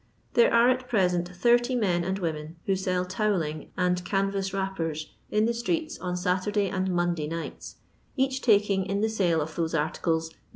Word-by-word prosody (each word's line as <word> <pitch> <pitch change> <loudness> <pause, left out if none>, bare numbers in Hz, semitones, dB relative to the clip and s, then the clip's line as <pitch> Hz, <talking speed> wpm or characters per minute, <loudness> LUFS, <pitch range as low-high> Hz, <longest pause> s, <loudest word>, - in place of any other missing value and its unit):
There 235 - +5
are 235 +1 +5
at 255 0 +1
present 180 -6 +1 0.2
80 240 +1 +4
men 180 -7 +1
and 190 +2 -1
women 160 -3 -4
who 195 - +2
sell 185 -1 -1
towelling 180 -6 -1
and 180 -1 +1
can 195 +1 0
vas 195 -1 -2
wrappers 170 -6 -3 0.2
in 210 +1 +2
the 235 - +1
streets 315 +7 -2
on 180 -1 -3
Satur 185 +2 0
day 205 -2 +1
and 190 -1 -1
Monday 175 -3 0
nights, 165 +1 -6 0.4
each 265 0 +1
taking 200 -4 +3
in 200 +2 -1
the 220 - +2
sale 180 -7 +1
of 155 +1 -5
those 165 -1 -1
articles 160 +1 0
9#. - - -22
190 Hz, 190 wpm, -27 LUFS, 170-215 Hz, 0.4 s, There